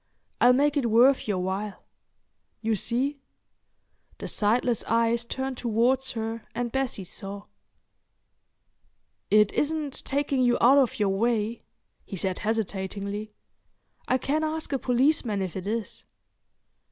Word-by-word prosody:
I'll 245 - +7
make 290 +3 +2
it 245 -5 +1
worth 245 +4 +4
your 205 -3 0
while. 190 +3 -3 0.7
You 225 0 0
see." 255 +7 -1 1.0
The - - -6
sightless 230 +2 +1
eyes 230 +1 +2
turned 265 +1 -4
towards 245 +3 +1
her 225 -1 -4
and 240 -1 -2
Bessie 265 -6 -1
saw. 200 +2 -7 1.9
"It 210 0 +4
isn't 300 -2 -1
taking 280 -1 0
you 245 -1 +3
out 270 +4 +6
of 260 -4 +1
your 205 -2 +1
way?" 220 +2 0 0.4
he 200 - -7
said 185 0 -2
hesitatingly. 205 -1 -3 0.7
"I 255 - +3
can 295 +4 -1
ask 315 -1 -3
a 270 - +1
policeman 250 -4 +1
if 185 -3 -3
it 190 0 -5
is." 225 0 -4
230 Hz, 130 wpm, -26 LUFS, 210-265 Hz, 1.9 s, I'll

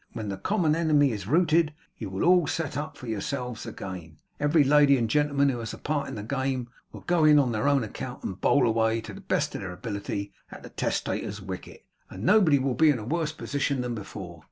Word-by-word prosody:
When 110 -2 -5
the 95 - -4
common 160 - +1
enemy 150 -4 +3
is 100 -3 -5
routed, 160 +1 +3 0.2
you 105 - -6
will 95 0 -3
all 175 -1 +5
set 160 -3 -2
up 150 +2 -4
for 130 - -10
yourselves 125 +2 -4
again; 85 -5 -8 0.2
every 145 +1 +4
lady 140 0 +5
and 115 -2 0
gentleman 140 +2 +2
who 125 -3 -2
has 115 -1 -5
a - - -13
part 145 -1 -2
in - - -6
the 105 - -5
game, 130 0 -2 0.2
will - - -10
go 175 -2 +1
in 150 -1 +7
on 135 -4 +3
their 110 +3 0
own 140 -3 +3
account 125 +3 -7
and 95 -1 -5
bowl 140 -3 +4
away, 115 0 +2
to - - -9
the - - -10
best - - -1
of - - -5
their 95 -2 -5
ability, 100 +1 -5 0.2
at - - -11
the - - -9
testator's 100 - -2
wicket, 95 -2 -8 0.2
and 95 - -8
nobody 185 - +5
will 135 -1 0
be 155 +6 +4
in 145 - +3
a 110 - -7
worse 160 +4 -1
position 140 -2 -2
than 125 -1 -3
before. 95 -5 -8
130 Hz, 225 wpm, -27 LUFS, 110-150 Hz, 0.2 s, in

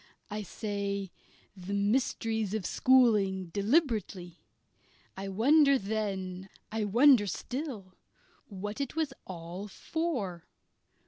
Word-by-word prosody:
I 210 +1 -3
say 200 -1 -3 0.4
"the 195 +1 -5
mysteries 220 0 0
of 210 -5 -3
schooling" 210 -9 +3
deliberately. 205 - 0 0.8
I 195 +1 -5
wondered 275 +6 +4
then, 195 -3 -3 0.2
I 220 -1 -1
wonder 235 +1 +5
still, 230 - -5 0.5
what 205 +5 -5
it 275 - -4
was 315 -4 -1
all 180 +2 -7
for. 210 - -3
205 Hz, 100 wpm, -30 LUFS, 190-245 Hz, 0.8 s, wonder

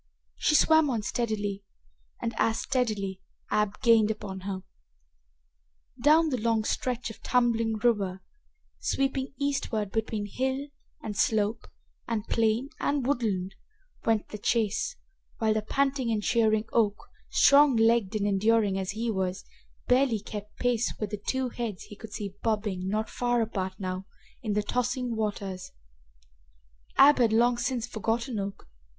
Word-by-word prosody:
She 305 - +2
swam 315 -1 +5
on 230 -5 -1
steadily, 205 -4 -2 0.6
and, 230 - -2
as 225 0 +2
steadily, 205 -7 -1 0.3
Ab 210 -1 +1
gained 225 -3 +5
upon 205 -3 -4
her. 190 0 -5 1.4
Down 310 +4 +5
the 255 -6 -2
long 225 -1 +2
stretch 245 +1 -2
of - - -14
tumbling 230 -3 +2
river, 200 -5 0 0.6
sweeping 270 0 -1
eastward 250 -8 -1
between 220 -1 -2
hill 265 +6 -2 0.3
and 210 - -4
slope 215 +2 +1 0.4
and 225 -2 -2
plain 230 +4 +1
and 285 -3 0
woodland, 210 -9 0 0.5
went 225 -2 +1
the 210 - -7
chase, 225 - 0 0.4
while 220 -1 +2
the 215 - 0
panting 270 +2 0
and 215 -2 0
cheering 220 -2 +2
Oak, 210 -3 +3 0.3
strong 285 -1 +6
legged 225 -2 +3
and 205 -1 0
enduring 205 0 +2
as 190 0 -3
he 225 +2 -1
was, 190 -2 -2 0.4
barely 250 -3 +3
kept 210 0 -8
pace 245 -1 +1
with 210 -2 -3
the 210 -1 -4
two 260 -1 0
heads 230 -5 -5
he 210 - -11
could 220 +1 -11
see 205 -2 -5
bobbing, 210 -4 -1
not 215 +3 -1
far 245 -1 0
apart 190 -4 -2
now, 185 -1 -4 0.3
in 215 -3 -2
the 210 0 +1
tossing 245 +2 -1
waters. 200 -4 -3 1.3
Ab 290 +1 +7
had 235 -3 +4
long 240 +2 +3
since 245 -1 -1
forgotten 230 +1 -2
Oak. 195 0 -5
225 Hz, 145 wpm, -28 LUFS, 205-245 Hz, 1.4 s, Ab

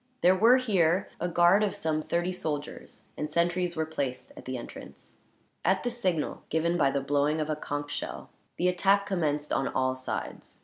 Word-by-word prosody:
There 180 +1 +6
were, 230 +6 +6
here, 190 -7 +2
a 175 - -1
guard 175 +3 +4
of 205 - 0
some 155 -1 -1
thirty 175 +3 -1
soldiers, 150 -4 -5
and 150 - -3
sentries 175 +2 0
were 160 0 0
placed 140 -5 -4
at - - -12
the 130 0 -3
entrance. 120 - -11 0.5
At 190 +2 +2
the 245 - -1
signal, 185 -10 -1
given 165 +2 +1
by 150 -5 +3
the 140 0 -1
blowing 145 +2 +1
of 155 0 -1
a - - 0
conch 145 -1 -4
shell, - - -5 0.3
the 180 - +1
attack 195 +2 +3
commenced 150 -7 -1
on 135 - +1
all 130 0 0
sides. 130 0 -6
165 Hz, 185 wpm, -28 LUFS, 145-185 Hz, 0.5 s, There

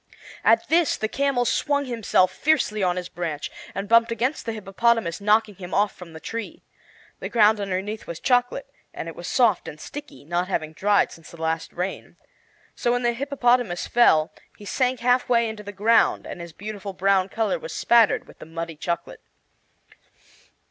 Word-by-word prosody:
At - - +4
this 335 0 +3
the 220 - -1
camel 270 +1 0
swung 285 +3 +1
himself 220 -6 +2
fiercely 245 -4 +1
on 180 -2 +2
his 180 -1 -4
branch, 165 -4 -4 0.2
and 195 +1 -3
bumped 230 +1 +5
against 240 +4 -1
the - - 0
hippopotamus, 215 -2 0
knocking 210 +1 +3
him 180 -1 -7
off 205 0 +2
from 175 -3 -12
the 160 - -9
tree. 230 +5 -6 0.6
The - - -5
ground 215 -2 +4
underneath 200 +2 -3
was 170 - -6
chocolate, 245 +2 +1 0.3
and - - -5
it 165 - -7
was 175 - -7
soft 230 -7 +2
and 150 - -8
sticky, 290 - -9
not 175 +3 -1
having 155 -4 -2
dried 205 +4 +2
since 165 -2 -13
the 170 - -13
last 160 0 -2
rain. 180 +2 -5 0.6
So 240 - +1
when 245 0 -1
the 240 0 +2
hippopotamus 245 -7 +1
fell 160 -10 +4 0.3
he 205 - -12
sank 255 +3 0
half 250 +1 +2
way 235 -1 +3
into 220 -1 -6
the 205 0 -8
ground, 210 +4 +3
and 175 - -7
his 170 0 -8
beautiful 205 +2 -7
brown 195 0 +2
color 225 - -1
was - - -7
spattered 235 -3 +3
with - - -17
the - - -11
muddy 165 -1 -6
chocolate. 170 +2 -4
210 Hz, 180 wpm, -24 LUFS, 180-240 Hz, 0.6 s, bumped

